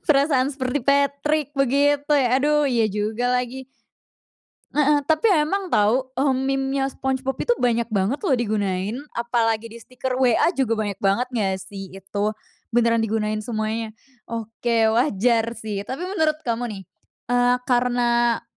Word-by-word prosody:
Perasaan 275 -2 +3
seperti 260 0 -2
Patrick 280 +2 +1
begitu, 285 +2 +2
ya? 265 -4 +3
Aduh, 295 +1 +2
iya 235 -4 +2
juga 215 +4 -1
lagi. 250 +1 -2 1.1
Heeh 295 -1 +2
tapi 315 +9 +2
emang 375 +2 +1
tau, 245 +4 +2
eee, 270 0 +2
memenya 270 +1 -1
Spongebob 265 0 -3
itu 485 - +1
banyak 235 -1 +2
banget 200 +8 +1
loh - - +3
digunain, 205 -3 -1 0.2
apalagi 230 -1 0
di 230 - -11
stiker 255 +2 -5
WA 255 +4 +3
juga 255 -4 +1
banyak 205 -2 -3
banget 200 +7 +1
nggak 210 -6 0
sih 195 -1 -9
itu? 195 +2 -4 0.5
Beneran 230 -1 +3
digunain 215 -1 -1
semuanya. 220 -1 -3 0.3
Oke, 230 0 0
wajar 230 -1 +2
sih. 215 -3 -5
Tapi 265 +6 -5
menurut 315 -5 0
kamu 235 -1 -2
nih, 195 - -8 0.5
eee, 245 0 +3
karena 240 -1 +2
245 Hz, 140 wpm, -23 LUFS, 225-275 Hz, 1.1 s, Perasaan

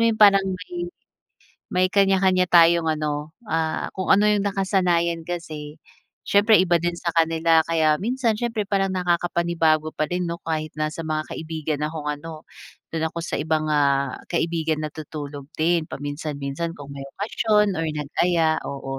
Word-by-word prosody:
mo - - +4
yung 220 -1 -1
parang 195 -2 +7
may 185 - -6 0.9
may 185 0 +3
kaniya-kaniya 190 -1 +3
tayong 170 -1 +5
ano, 150 -1 -2 0.2
ah, 160 -2 -1
kung 185 - -3
ano 205 +2 +5
'yong 210 -1 +3
nakasanayan 180 -4 +1
kasi, 160 -3 -6 0.5
siyempre 210 +2 +5
iba 175 -2 +3
din 175 +1 -1
sa 170 - -2
kanila. 165 0 +3
Kaya 160 -2 +3
minsan 235 +1 0
siyempre 230 -2 -1
parang 195 -1 +1
nakakapanibago 170 -3 +1
pa 155 - 0
din, 180 0 -1
'no, 170 - -3
kahit 155 -1 -3
nasa 155 +1 -2
mga 155 0 -2
kaibigan 155 -2 -4
akong 155 -1 -6
ano, 155 +1 -7 0.5
do'n 160 0 0
ako 165 - -5
sa - - -3
ibang, 155 0 0
ah, 140 -2 +1
kaibigan 165 -2 -1
natutulog 150 -2 -7
din 165 0 +1
paminsan-minsan 145 +2 -4
kung 145 -2 -11
may 140 -1 -7
okasyon 210 0 +1
or 165 - -1
nag-aya, 160 +2 +1
oo. 135 -1 -5
165 Hz, 150 wpm, -23 LUFS, 155-185 Hz, 0.9 s, parang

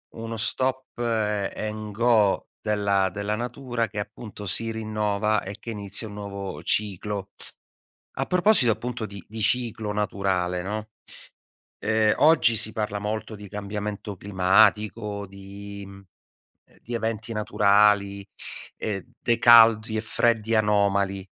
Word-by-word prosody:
uno 115 0 -5
stop 130 +4 -1
a 105 -4 0
and 110 0 -5
go 110 -3 +3
della 100 -3 +1
della 105 +3 -2
natura 120 0 -3
che, 105 - -5
appunto, 105 0 -7
si 115 +4 0
rinnova 105 -1 0
e 100 +1 -7
che 115 - -6
inizia 105 +1 -2
un 105 - -9
nuovo 100 -5 -6
ciclo. 100 0 -2 0.8
A - - -1
proposito, 180 - +4
appunto, 120 0 -5
di 100 -3 -9
di 110 +1 -6
ciclo 110 -1 0
naturale, 95 -3 -1
no, 105 +3 -4 0.9
ehm, 110 0 +2
oggi 150 -7 +5
si 110 +1 0
parla 105 -1 -2
molto 110 +1 -4
di 100 -1 -11
cambiamento 105 0 -5
climatico, 100 +2 +2
di 100 +1 -9
mhmm, 100 0 -12 0.8
di 120 - -7
eventi 115 -1 -3
naturali 105 -1 +3 0.5
e 100 -4 -4
dei 120 -1 +1
caldi 115 -2 +7
e - - +1
freddi 115 0 +1
anomali. 100 -2 +2
105 Hz, 125 wpm, -25 LUFS, 100-110 Hz, 0.9 s, caldi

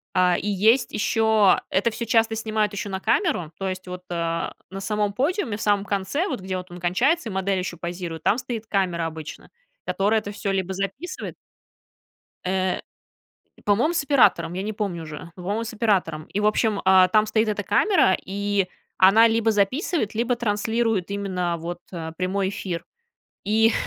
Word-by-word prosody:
А, 180 -1 +4
и 205 - -4
есть 215 +6 +3
ещё 220 -2 +3
это 205 +5 +2
всё 235 +1 -4
часто 225 0 +2
снимают 215 -1 0
ещё 200 0 -4
на 190 - -3
камеру. 230 - +1
То 195 - -3
есть 185 0 -5
вот, 180 0 -7
а, 165 -1 -2 0.2
на 195 +1 -6
самом 210 0 -1
подиуме, 265 - -1
в 220 - -8
самом 205 -2 +2
конце 205 - -1
вот, 260 - -3
где 185 0 -4
вот 180 -1 -6
он 175 - -8
кончается, 235 - +1
и - - -6
модель 190 0 0
ещё 180 -2 -4
позирует, 170 -2 -5
там 210 - +3
стоит 245 -3 -5
камера 180 -5 0
обычно, 160 -1 -7 0.4
которая 210 +3 +1
это 205 - -6
всё 205 -1 -3
либо 190 -1 -1
записывает 200 - -5 1.1
Э, 185 0 0 0.9
по-моему, 235 +12 +3
с 330 - 0
оператором, 250 - +3
я 185 +2 -3
не 215 +1 -3
помню 195 -6 -3
уже. 155 +2 -9
Но, 180 - -10
по-моему, 205 +5 -1
с 230 - -6
оператором. 190 -9 0
И, 200 - -3
в 210 - 0
общем, 215 0 +2
а, 190 -1 +7
там 215 +2 +3
стоит 220 +1 +1
эта 205 -1 -2
камера, 370 - +3
и 200 0 0 0.3
она 215 +5 +7
либо 225 0 +2
записывает, 220 - 0
либо 240 +2 +1
транслирует 220 -3 0
именно 185 -4 -2
вот 170 +1 -5 0.4
прямой 190 +1 0
эфир. 175 -4 -4 0.6
И 220 +2 +4
200 Hz, 175 wpm, -24 LUFS, 185-225 Hz, 1.1 s, а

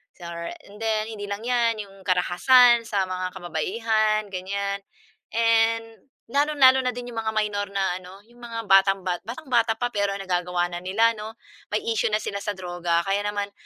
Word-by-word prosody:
Sor 170 -1 -7 0.2
and 205 - -13
then 220 0 -1
hindi 210 -2 -6
lang 200 +1 -5
‘yan, 235 -2 +1
'yong 195 -2 -14
karahasan 230 +7 +5
sa 195 -4 -1
mga 185 0 -3
kababaihan 215 +5 0
ganiyan, 200 +2 -3 0.5
and 225 +1 +1 0.2
lalong-lalo 280 -2 +5
na 250 -2 -1
din 245 0 -6
'yong 225 - -4
mga 220 -1 -3
minor 205 -1 0
na 195 -2 -1
ano, 185 +2 -13
'yong 240 +2 -22
mga 235 -1 -6
batang 195 -1 +4
ba 180 -1 -1
batang-bata 235 -3 0
pa 245 +2 -2
pero 200 -2 0
nagagawa 180 -2 -1
na 175 - -4
nila 205 +6 +2
'no. 220 +1 -7 0.3
May 210 - -2
issue 225 -1 +1
na 215 0 0
sila 200 - -3
sa 205 0 -4
droga 175 -2 -1
kaya 200 +2 0
naman 205 -1 -3
205 Hz, 175 wpm, -24 LUFS, 185-230 Hz, 0.5 s, karahasan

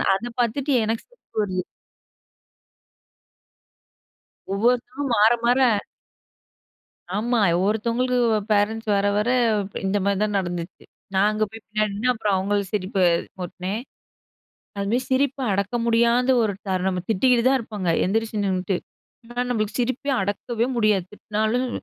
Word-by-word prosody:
அத 230 +5 -4
பாத்துட்டு 265 +5 -1
எனக்கு 225 +1 -2
சிரிப்பு - - -20
வருது. 185 -2 -2 2.9
ஒவ்வொருத்தரும் 250 +5 0
மாற, 215 +2 +6 0.2
மாற 245 +2 +4 1.5
ஆமா. 235 +4 +1 0.3
ஒருத்தவங்களுக்கு 235 +4 +1 0.3
பேரன்ட்ஸ் 215 +2 +1
வர 200 0 +2
வர 215 +4 +1 0.6
இந்த 195 +2 +1
மாரி 200 -1 +1
தான் 210 -1 -1
நடந்துச்சு. 175 -1 -5 0.3
நான் 195 +2 +4
அங்க 215 0 0
போய் 225 -1 -11
பின்னாடி 215 0 -1
நின்னேன். 250 +5 +1
அப்புறம் 210 -4 0
அவங்கள 200 +2 0 0.2
சிரிப்பு 190 -1 -1 0.4
முட்டினேன். 185 +5 -4 1.0
அது 200 - -2
மாரி 245 - +2
சிரிப்ப 270 +1 +1
அடக்க 200 +4 -1
முடியாத 235 +2 +3
ஒரு 215 -2 +1 0.2
தருணம் 185 0 0
நம்ம 180 -2 -2
திட்டிக்கிட்டு 235 +3 +3
தான் 270 - +3
இருப்பாங்க 210 -5 -5 0.2
எந்திரிச்சு 220 +2 -1
நின்னுட்டு, 185 -1 0 0.5
ஆனா 245 +1 -3
நம்மளுக்கு 215 -2 -1
சிரிப்ப 255 +3 -2 0.2
அடக்கவே 225 +4 -1
முடியாது 210 -5 +2
திட்டினாலும் 220 +4 -1
215 Hz, 125 wpm, -23 LUFS, 200-240 Hz, 2.9 s, மாற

